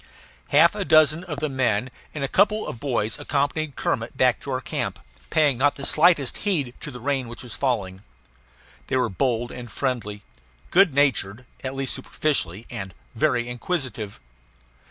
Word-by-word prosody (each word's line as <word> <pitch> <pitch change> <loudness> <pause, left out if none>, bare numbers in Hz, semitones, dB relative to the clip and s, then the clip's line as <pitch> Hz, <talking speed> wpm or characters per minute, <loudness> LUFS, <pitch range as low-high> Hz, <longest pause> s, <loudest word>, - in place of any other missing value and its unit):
Half - - +5
a - - -2
dozen 155 +2 +5
of 150 -5 -5
the 155 - +1
men 125 -3 0 0.2
and 150 - -3
a - - +1
couple 210 +7 +2
of 115 - -6
boys 115 -6 -1
accompanied 145 0 -1
Kermit - - -2
back - - +3
to - - -9
our - - 0
camp, - - -3 0.3
paying 150 -6 +3
not 145 +1 +3
slightest 155 -5 +4
heed 150 - -1
to - - -6
the 125 -3 -9
rain 135 0 -1
which 120 +3 -8
was 120 - -7
falling. 100 -8 -1 0.9
They 130 - 0
were 125 -3 +1
bold 120 +3 -1
and 120 -3 -8
friendly, 110 -7 -3 0.5
good 180 -6 +5
natured 125 -5 +1 0.2
at 130 0 -4
least 135 -1 -1
superficially 115 - -1
and 95 -6 -6 0.2
very 120 -1 +1
inquisitive. 120 - -3
130 Hz, 160 wpm, -24 LUFS, 115-145 Hz, 0.9 s, Half